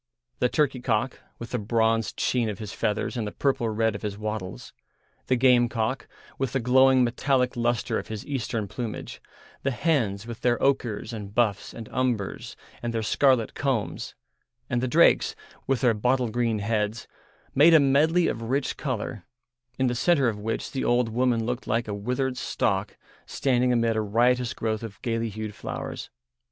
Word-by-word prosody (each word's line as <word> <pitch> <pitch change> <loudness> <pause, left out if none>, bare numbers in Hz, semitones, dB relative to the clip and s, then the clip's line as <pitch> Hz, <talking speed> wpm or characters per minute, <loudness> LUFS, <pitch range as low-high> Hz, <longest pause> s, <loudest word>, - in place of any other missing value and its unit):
The 125 - +2
turkey 135 -3 +1
cock, 120 +1 -1 0.2
with 115 - -8
the 125 - -1
bronzed 115 +1 +1
sheen 120 -3 +1
of 105 - -4
his 105 -1 -7
feathers 105 - -1
and 115 -3 -2
the - - -4
purple 135 -3 0
red 110 0 +1
of 100 - -6
his 105 -2 -4
wattles, 105 - -5 0.5
the 130 - +3
gamecock, 120 -1 +2 0.3
with 135 -3 -1
the 135 - +1
glowing 130 +1 +5
metallic 125 +1 +1
lustre 120 0 0
of - - -8
his 110 -2 -6
Eastern 115 -6 -2
plumage, 110 +1 -6 0.4
the 140 - 0
hens, 120 -8 0
with 115 -1 -8
their 120 -1 +2
ochres 120 -5 0
and 105 -2 -7
buffs 115 -4 +1
and 115 -2 -9
umbers 125 -6 -2 0.3
and 120 -1 -3
their 115 - 0
scarlet 130 0 +2
combs, 130 -7 -2 0.6
and 120 0 +1
the 130 - 0
drakes, 120 - +4 0.3
with 135 -2 +1
their 125 -3 +4
bottle 125 +3 +1
green 115 -1 0
heads, 105 +1 -1 0.5
made 160 +4 +7
a - - +8
medley 150 +5 +3
of 115 - -2
rich 135 0 -1
colour, 110 -7 -4 0.5
in 130 - +1
the 125 - +1
centre 140 +1 +3
of 105 -3 -1
which 110 +2 -3
the 135 - -2
old 120 -1 +2
woman 120 -1 +1
looked 125 +2 -3
like 115 +1 0
a 105 - -3
withered 125 +5 -2
stalk 100 -5 -1 0.3
standing 125 -2 +1
amid 115 -2 +2
a 110 - +1
riotous 120 +3 +2
growth 110 -1 -2
of 110 -3 -8
gaily 115 -1 -1
hued 110 0 -6
flowers. - - -6
120 Hz, 175 wpm, -26 LUFS, 110-130 Hz, 0.6 s, a